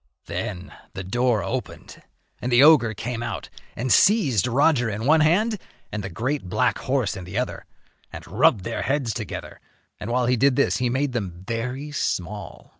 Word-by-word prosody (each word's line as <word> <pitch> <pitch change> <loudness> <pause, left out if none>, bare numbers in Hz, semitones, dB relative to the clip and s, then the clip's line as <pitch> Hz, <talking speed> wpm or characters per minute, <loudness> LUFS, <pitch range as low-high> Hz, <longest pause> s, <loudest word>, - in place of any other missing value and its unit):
Then 90 -3 -5 0.2
the 95 - -4
door 120 +3 +1
opened - - -6 0.4
and 125 - -2
the 120 +3 +6
ogre 135 -8 +6
came 115 +2 -4
out 120 - -5 0.3
and 125 +1 +1
seized 150 - +4
Roger 130 -1 +3
in 110 +2 -4
one 155 +3 +5
hand 200 +8 +2 0.3
and 105 -1 -4
the 95 - -4
great 120 - -3
black 125 +6 +1
horse 130 -8 -1
in 95 - -7
the 90 +4 -6
other 125 - -3 0.4
and - - -9
rubbed 100 - +3
their 115 +4 -3
heads 135 -5 0
together, - - -7 0.4
and 105 - -6
while 125 +1 +1
he 125 +1 +2
did 135 +2 +3
this 140 - +2
he 125 -1 0
made 135 +3 0
them 95 -7 -4
very 125 +5 -3
small. 105 - -4
120 Hz, 180 wpm, -24 LUFS, 105-140 Hz, 0.4 s, the